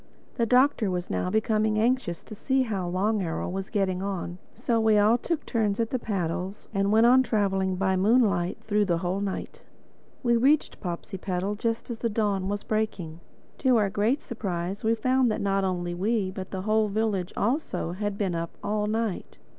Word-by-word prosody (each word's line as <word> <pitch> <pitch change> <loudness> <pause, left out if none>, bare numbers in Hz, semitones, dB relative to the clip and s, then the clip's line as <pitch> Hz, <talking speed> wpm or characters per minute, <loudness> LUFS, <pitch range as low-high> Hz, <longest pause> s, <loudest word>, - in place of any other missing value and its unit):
The 235 -3 0
Doctor 250 -3 +4
was 180 -1 -3
now 90 -1 -1
becoming 215 0 +1
anxious 225 -6 0
to - - -10
see 265 +5 +1
how 200 -7 -2
Long 200 +4 0
Arrow 165 -3 -2
was 190 +1 -4
getting 190 -3 0
on, 185 -2 -4 0.2
so 230 -1 0
we 220 -1 +4
all 210 +3 +5
took 310 +6 -2
turns 215 -4 0
at 230 -1 0
the 255 - 0
paddles 190 -1 -3
and 195 0 +1
went 220 +2 +5
on 255 +2 +7
traveling 195 -5 0
by 190 0 +1
moonlight 195 -3 +2
through 210 -1 +1
the 175 -3 +1
whole 180 +3 -2
night. 200 -2 -4 0.6
We 235 -1 +3
reached 280 +6 +2
Popsipetel 185 +1 -3
just 230 +2 -2
as 230 - -5
the 230 - 0
dawn 205 -3 0
was 205 0 -2
breaking. 195 -7 -2 0.4
To 255 -3 +4
our 205 -3 +2
great 225 +9 +1
surprise 190 -4 -4
we 225 +1 +3
found 255 +2 +2
that 215 - -1
not 195 0 +1
only 175 -2 -1
we, 195 +1 0
but 185 0 -7
the 190 -1 -4
whole 215 +1 +2
village 205 -3 -1
also, 235 - -1
had 205 +2 -3
been 195 -4 -1
up 165 0 -4
all 210 0 0
night. 220 -2 -2
205 Hz, 185 wpm, -27 LUFS, 185-225 Hz, 0.6 s, on